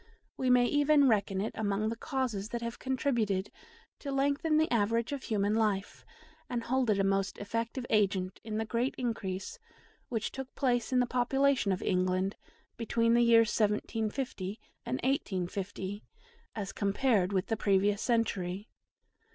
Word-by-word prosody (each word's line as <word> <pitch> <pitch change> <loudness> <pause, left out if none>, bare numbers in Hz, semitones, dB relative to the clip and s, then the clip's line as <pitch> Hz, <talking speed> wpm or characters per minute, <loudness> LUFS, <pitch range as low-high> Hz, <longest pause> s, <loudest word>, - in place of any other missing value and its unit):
We 260 - -1
may 250 -1 +5
even 290 +1 +4
reckon 200 -4 +1
it 215 - -2
among 215 0 -1
the 230 - -3
causes 235 -6 -2
that 235 0 -4
have 235 0 -5
contributed 235 -8 0 0.5
to 280 - -5
lengthen 285 +4 +1
the 315 +1 +2
average 230 +2 +1
of 280 -2 -3
human 205 -2 +1
life, 210 -3 0 0.5
and 240 -2 -2
hold 255 0 +1
it 210 - +3
a 195 - +2
most 195 0 0
effective 230 +4 -3
agent 195 -3 +1
in 215 -1 -4
the 220 - -1
great 235 +4 -1
increase 225 - -3 0.5
which 230 -2 -2
took 265 -1 -7
place 245 -3 0
in 255 - +2
the - - +2
population 255 -1 +2
of 185 - -2
England 185 +1 +1 0.4
between 230 0 +1
the 240 - +5
years 230 -1 +5
1750 215 -1 -1 0.3
and 255 - 0
1850 195 -5 -2 0.5
as 200 -3 -4
compared 200 -1 +1
with 190 -1 0
the 225 - -1
previous 200 0 +2
century. 205 -4 -1
225 Hz, 150 wpm, -31 LUFS, 200-250 Hz, 0.5 s, may